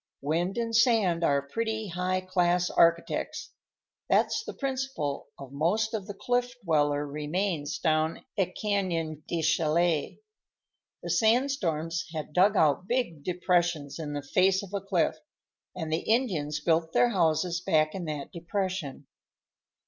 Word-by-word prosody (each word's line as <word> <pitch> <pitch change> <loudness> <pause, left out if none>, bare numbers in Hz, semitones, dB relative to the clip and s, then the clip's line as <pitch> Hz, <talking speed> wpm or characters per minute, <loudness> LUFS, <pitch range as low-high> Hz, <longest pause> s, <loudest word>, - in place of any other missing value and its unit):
Wind 170 +8 -1
and 230 -1 -1
sand 220 -8 +3
are 140 -3 +2
pretty 220 +6 -3
high 180 +2 -1
class 180 -1 +1
architects. 170 0 +1 0.6
That's 440 - +2
the - - -7
principle 265 - -3
of 135 -2 -10
most 185 +11 0
of 210 -3 -3
the 205 - -6
Cliff 245 +2 -1
Dweller 145 -3 +2
remains 150 +2 -2
down 155 -1 0
at 185 -2 -1
Canyon 170 -7 -1
de 170 -2 -2
Chelly. 160 0 +1 0.8
The - - -3
sandstorms 185 - +1
had 155 -1 -5
dug 195 +4 +4
out 155 +4 +3
big 235 - -1
depressions 175 -4 0
in 150 -2 -4
the 145 -1 -4
face 190 +6 +2
of 195 0 -11
a 200 - -1
cliff, 185 -4 0 0.6
and 160 -3 -3
the - - +3
Indians 170 - 0
built 165 0 +1
their 245 - +4
houses 170 -3 +1
back 155 -3 +2
in 185 -3 -5
that 150 -3 -5
depression." 170 -5 -4
175 Hz, 140 wpm, -28 LUFS, 155-200 Hz, 0.8 s, dug